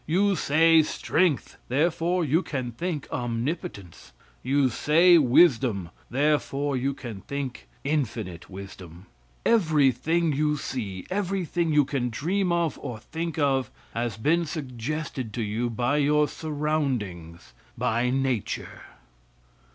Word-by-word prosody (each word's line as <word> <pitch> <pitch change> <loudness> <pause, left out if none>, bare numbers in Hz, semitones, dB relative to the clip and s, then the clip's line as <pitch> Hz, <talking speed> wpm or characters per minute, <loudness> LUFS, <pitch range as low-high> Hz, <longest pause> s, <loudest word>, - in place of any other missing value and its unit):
You 195 +5 +3
say 165 +1 +5
strength, 155 0 0
therefore 170 +5 +1
you 155 +5 +2
can 130 -8 -4
think 160 +4 -4
omnipotence. 120 - -4 0.3
You 135 +1 +2
say 170 +8 +5
wisdom, 125 - +3 0.2
therefore 145 0 +1
you 135 +2 -1
can 115 -8 -8
think 135 0 -5 0.2
infinite 115 - -2
wisdom. 95 -2 -10 0.4
Everything 160 - +3
you 150 +1 +1
see, 100 -10 -5
everything 180 -4 -1
you 150 -2 +4
can 130 -3 -1
dream 180 - 0
of 170 -3 0
or 120 - -5
think 165 +8 -5
of, 135 -5 +1 0.2
has 115 -2 -2
been 165 +8 +1
suggested 135 -3 -4
to 115 - -1
you 110 +3 -1
by 125 +5 0
your 150 +1 +3
surroundings, 130 - -3 0.2
by 120 +2 +1
nature. 130 -4 -2
140 Hz, 115 wpm, -26 LUFS, 120-160 Hz, 0.4 s, say